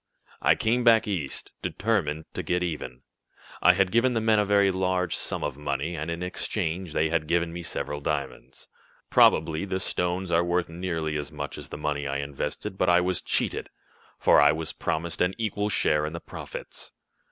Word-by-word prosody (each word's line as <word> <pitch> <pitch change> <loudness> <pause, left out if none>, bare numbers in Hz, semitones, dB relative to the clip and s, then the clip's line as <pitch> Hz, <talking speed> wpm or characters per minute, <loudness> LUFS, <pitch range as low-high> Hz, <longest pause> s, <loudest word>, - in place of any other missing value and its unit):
"I - - +5
came 120 +3 +1
back 115 -2 +5
East, 85 -9 -2
determined 80 -8 -1
to - - -2
get 90 0 0
even. 75 -6 -5 0.6
I 90 - +7
had 95 0 +2
given 120 +2 +3
the - - +2
men 110 -1 +3
a 105 - +2
very 100 -1 +4
large 95 -1 0
sum - - -2
of 75 -2 -3
money, 75 +3 -2
and, 75 +1 -4
in 85 +1 -3
exchange, 90 -2 -2
they 80 +1 +2
had 80 -1 0
given 85 0 +1
me 85 - -5
several 75 -3 -3
diamonds. 70 -3 -4 0.4
Probably 80 +2 +4
the 95 -1 -2
stones 90 0 -1
are 85 0 +4
worth 85 0 0
nearly 80 -3 -2
as 75 -1 -5
much - - -5
as - - -9
the - - -6
money 75 -1 -2
I 70 0 -1
invested, 70 +6 -4
but 90 - +3
I 90 0 +6
was 90 0 0
cheated, - - -1 0.5
for - - +5
I 75 - +6
was 80 0 -3
promised 80 +1 -2
an 90 +1 +2
equal 105 -2 -1
share 75 -6 +2
in 80 - -6
the 85 - -4
profits. - - -8
85 Hz, 190 wpm, -26 LUFS, 75-95 Hz, 0.6 s, I